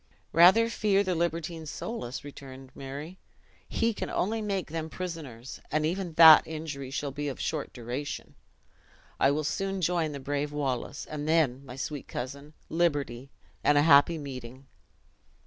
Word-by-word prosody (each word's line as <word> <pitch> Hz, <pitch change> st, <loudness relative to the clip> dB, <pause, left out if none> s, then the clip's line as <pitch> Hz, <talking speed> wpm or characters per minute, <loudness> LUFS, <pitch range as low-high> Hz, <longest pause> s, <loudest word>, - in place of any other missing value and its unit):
"Rather 185 Hz, +8 st, +7 dB
fear 205 Hz, -3 st, +2 dB
the 185 Hz, -2 st, 0 dB
libertine 165 Hz, -1 st, -2 dB
Soulis," 145 Hz, -, -5 dB
returned 135 Hz, -2 st, -11 dB
Murray, 145 Hz, +7 st, -8 dB, 0.5 s
"he 230 Hz, 0 st, +1 dB
can -, -, -4 dB
only 220 Hz, +4 st, -1 dB
make 195 Hz, -6 st, -2 dB
them 160 Hz, -1 st, -3 dB
prisoners; 155 Hz, -10 st, -7 dB
and 155 Hz, 0 st, +1 dB
even 175 Hz, +1 st, -2 dB
that 160 Hz, -1 st, +9 dB
injury 155 Hz, -4 st, -5 dB
shall 140 Hz, +1 st, -3 dB
be 145 Hz, +1 st, -4 dB
of 135 Hz, -, -5 dB
short 155 Hz, -3 st, -3 dB
duration. 125 Hz, +4 st, -5 dB, 0.9 s
I 135 Hz, -, +5 dB
will 150 Hz, +2 st, 0 dB
soon 195 Hz, +5 st, -2 dB
join 170 Hz, -3 st, +1 dB
the 140 Hz, -, -6 dB
brave 145 Hz, +2 st, -2 dB
Wallace; 140 Hz, -2 st, -3 dB
and 150 Hz, -1 st, -5 dB
then, 140 Hz, -5 st, +2 dB
my 125 Hz, -, -8 dB
sweet 145 Hz, +1 st, -5 dB
cousin, 140 Hz, +4 st, -6 dB
liberty, 145 Hz, -7 st, -1 dB, 0.3 s
and 145 Hz, -, +4 dB
a 145 Hz, -, +5 dB
happy 155 Hz, +2 st, +6 dB
meeting!" 130 Hz, -2 st, -8 dB
150 Hz, 150 wpm, -28 LUFS, 140-170 Hz, 0.9 s, that